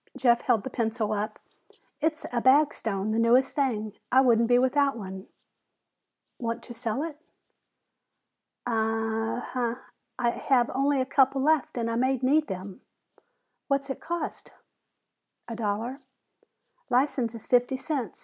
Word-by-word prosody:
Jeff 240 -3 +3
held 230 -5 +2
the - - -4
pencil 225 -2 -1
up. 210 +1 -3 0.6
"It's 310 +1 0
a 240 - +1
Bagstone, 230 -7 +2
the 220 - +1
newest 245 +3 +4
thing. 220 -7 -1 0.2
I 260 - +6
wouldn't 235 -3 +4
be 245 +1 +5
without 275 +1 +2
one." 190 -2 -8 1.1
"Want 230 -1 -3
to 240 - -8
sell 230 +3 -2
it?" 310 -3 -6 1.5
"Uh 225 0 -1
uh. 240 -2 0 0.4
I 240 -1 +1
have 245 -1 +1
only 275 +1 +2
a 260 - +1
couple 270 0 +3
left 310 -3 +2
and 230 -1 -1
I 230 0 -1
may 260 +2 +2
need 285 +5 +2
them." 190 +5 -7 0.9
"What's 275 0 0
it - - -5
cost?" 345 -1 -5 1.0
"A 230 - -5
dollar." 225 +4 -2 0.9
"License 250 -2 +1
is 225 - -10
fifty 245 +1 +2
cents. 260 - -4
245 Hz, 140 wpm, -27 LUFS, 225-270 Hz, 1.5 s, I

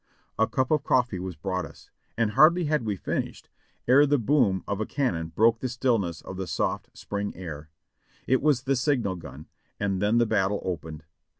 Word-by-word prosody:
A 110 - +4
cup 130 0 -1
of 150 -2 +3
hot - - -31
coffee 120 -7 +2
was 90 -1 -5
brought 95 +3 -3
us, - - -13 0.3
and 115 -2 +1
hardly 160 +8 +5
had 150 -4 0
we 105 -2 -1
finished - - -4 0.4
ere 140 +4 +6
the 145 +1 +3
boom 120 -6 +2
of 100 +1 -2
a - - 0
cannon 90 - -1
broke 115 +8 +3
the 130 - -3
stillness 115 -9 0
of 95 - -8
the 95 -1 -4
soft, - - -2
spring 100 0 -4
air. 80 -4 -8 0.6
It 130 - +2
was 140 -4 +2
the 135 0 +1
signal 120 -7 0
gun, 80 -3 -10 0.3
and 100 -2 -1
then 105 +3 +2
the 120 - +4
battle 105 -2 +1
opened. 80 -3 -5
110 Hz, 195 wpm, -26 LUFS, 95-130 Hz, 0.6 s, ere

